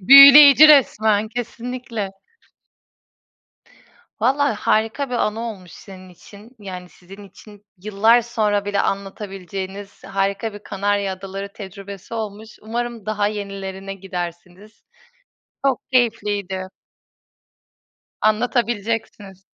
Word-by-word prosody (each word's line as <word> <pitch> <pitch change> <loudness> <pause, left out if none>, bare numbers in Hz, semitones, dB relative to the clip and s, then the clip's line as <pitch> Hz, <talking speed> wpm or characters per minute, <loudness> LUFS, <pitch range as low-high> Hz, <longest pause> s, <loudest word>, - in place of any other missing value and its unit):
Büyüleyici 280 +6 +10
resmen, 220 -7 +4
kesinlikle. 235 -2 -5 2.1
Valla 275 +2 +2
harika 225 +5 0
bir 250 - -3
anı 220 -1 -1
olmuş 200 -7 -7
senin 185 -2 -13
için. 200 +5 -16
Yani, 185 -3 -9
sizin 190 +3 -15
için 205 +2 -17
yıllar 215 +4 +3
sonra 210 -3 -1
bile 200 0 -1
anlatabileceğiniz 195 0 -6
harika 195 +3 -2
bir 205 - -9
Kanarya 200 -1 -2
Adaları 195 +1 -7
tecrübesi 200 +1 -10
olmuş. 220 0 -7
Umarım 230 -1 -5
daha 210 -1 0
yenilerine 195 -2 -6
gidersiniz. 180 +2 -8 0.8
Çok 265 -3 +1
keyifliydi. 205 -6 -1 1.5
Anlatabileceksiniz. 215 -3 -2
205 Hz, 90 wpm, -20 LUFS, 195-230 Hz, 2.1 s, Büyüleyici